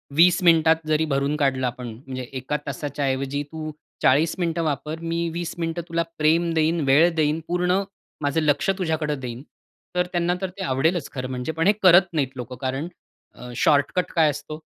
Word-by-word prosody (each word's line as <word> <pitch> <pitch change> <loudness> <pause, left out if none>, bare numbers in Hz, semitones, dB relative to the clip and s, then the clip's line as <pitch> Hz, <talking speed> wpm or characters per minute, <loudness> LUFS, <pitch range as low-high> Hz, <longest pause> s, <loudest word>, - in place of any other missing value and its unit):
20 175 +4 +5
मिनिटात 165 -2 +5
जरी 155 0 +2
भरून 140 0 0
काढलं 135 -3 +1
आपण 125 0 -5
म्हणजे 130 +3 -7 0.2
1 130 +4 -2
तासाच्या 145 0 -3
ऐवजी 135 +2 -1
तू 155 -1 -5 0.3
40 150 +5 +4
मिनिटं 170 -1 0
वापर. 155 +1 -3
मी 170 0 -2
20 170 0 -4
मिनिटं 165 0 -2
तुला 170 0 0
प्रेम 165 +2 +2
देईन, 160 +1 +2
वेळ 145 +6 +5
देईन. 155 0 +1
पूर्ण 180 +2 +1 0.4
माझं 145 +2 +1
लक्ष्य 175 +6 +2
तुझ्याकडं 155 -4 -1
देईन. 125 -1 -6 0.5
तर 180 0 +2
त्यांना 175 0 +1
तर 190 - -2
ते 195 - -4
आवडेलच 160 +4 0
खरं 130 -2 -4
म्हणजे 125 +3 -3
पण 165 +2 0
हे 205 - +6
करत 180 0 +7
नाहीत 140 -4 -1
लोकं 125 +1 -6
कारण 135 +4 -2 0.5
अ, 125 0 -9
शॉर्टकट 145 +7 +2
काय 160 -2 +5
असतो, 155 +1 -6
155 Hz, 180 wpm, -23 LUFS, 135-170 Hz, 0.5 s, करत